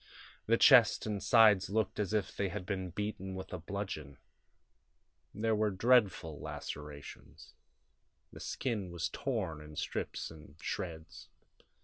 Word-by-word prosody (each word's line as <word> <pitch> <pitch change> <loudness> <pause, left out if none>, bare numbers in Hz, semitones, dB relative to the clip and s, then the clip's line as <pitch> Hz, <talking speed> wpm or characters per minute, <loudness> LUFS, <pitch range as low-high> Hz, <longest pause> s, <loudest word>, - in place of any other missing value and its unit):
The 115 +1 +4
chest 125 -4 +7
and 105 -2 -2
sides 105 -5 +6
looked 105 0 0
as 105 -2 -1
if 105 -3 -1
they 100 -1 -1
had 95 0 -5
been 95 -1 -3
beaten 95 0 -4
with 95 0 -7
a 90 - -3
bludgeon. 80 -7 -5 1.1
There 110 +2 0
were 105 0 +2
dreadful 95 -7 +2
lacerations; 75 -1 -8 0.8
the - - -10
skin 105 -7 -3
was 85 -1 -3
torn 100 - -3
in 75 0 -11
strips - - -3
and 75 -2 -14
shreds. 80 -2 -6
95 Hz, 130 wpm, -33 LUFS, 80-110 Hz, 1.1 s, chest